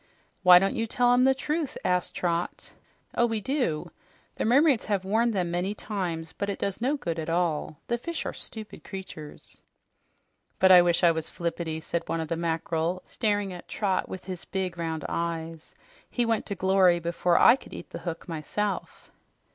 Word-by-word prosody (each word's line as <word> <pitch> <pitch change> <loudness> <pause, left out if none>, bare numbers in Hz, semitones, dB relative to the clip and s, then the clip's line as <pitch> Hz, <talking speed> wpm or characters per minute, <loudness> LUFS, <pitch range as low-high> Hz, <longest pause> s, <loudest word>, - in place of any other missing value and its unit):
"Why 180 -2 +9
don't 195 +2 +2
you 225 - -1
tell 245 +2 +3
'em 250 +1 +4
the 265 0 +4
truth?" 300 +2 -2
asked 180 -1 0
Trot. 170 -1 -2 0.4
"Oh, 240 - +3
we 225 -1 -1
do. 250 - -1 0.5
The - - -1
mermaids 270 +1 +4
have 200 -3 -1
warned 225 +4 +2
them 180 -4 -1
many 180 +4 -1
times, 175 -7 -4
but 200 - -3
it 200 - -2
does 200 +2 -3
no 275 +5 +1
good 170 -11 -3
at 160 - -4
all. 165 -3 0
The 235 0 -1
fish 335 +7 -4
are - - -3
stupid 215 -2 -7
creatures." 185 -6 -9 1.0
"But 190 0 +5
I 180 -1 +10
wish 175 0 +2
I 170 - +7
was 160 -1 -3
Flippity," 165 -1 -3
said 170 +2 -2
one 165 - -1
of 160 -1 -4
the 165 - 0
mackerel, 165 +1 -1
staring 205 -4 -1
at 175 - -10
Trot 195 -3 -1
with 185 -1 -7
his 180 -2 -6
big, 190 -3 -3
round 160 -2 -3
eyes. 165 -1 -4 0.3
"He 245 - 0
went 225 -1 0
to 200 - -3
glory 190 -1 +4
before 170 +1 +1
I - - +8
could - - -14
eat - - -9
the - - -6
hook 170 -2 -6
myself." 185 +5 -4
185 Hz, 185 wpm, -27 LUFS, 170-215 Hz, 1.0 s, I